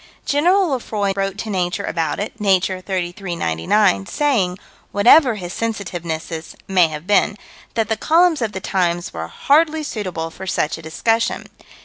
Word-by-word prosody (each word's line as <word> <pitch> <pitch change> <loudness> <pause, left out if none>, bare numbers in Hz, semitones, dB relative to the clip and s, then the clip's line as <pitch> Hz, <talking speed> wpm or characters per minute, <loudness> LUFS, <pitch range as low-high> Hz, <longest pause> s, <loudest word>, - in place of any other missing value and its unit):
General 355 +6 +3
Lefroy 215 -7 -1
wrote 195 0 -2
to 215 +1 -4
Nature 180 +1 -1
about 165 -5 -2
it 215 +3 -5
(Nature, 190 -2 +2
33 180 -1 -3
99), 95 - +1
saying 220 -12 +1 0.3
whatever 240 +5 +6
his 180 -3 -6
sensitivenesses 170 -7 -4
may 185 -3 +4
have 155 0 -7
been 205 +1 +2 0.4
that 225 -2 +1
the 220 - 0
columns 330 - +3
of 225 -2 -1
the 190 - -4
Times 175 -3 -1
were 80 0 -5
"hardly 310 - +2
suitable" 185 - -4
for 190 +3 -9
such 165 -3 -1
a - - -10
discussion. 225 +9 0
195 Hz, 150 wpm, -20 LUFS, 175-230 Hz, 0.4 s, whatever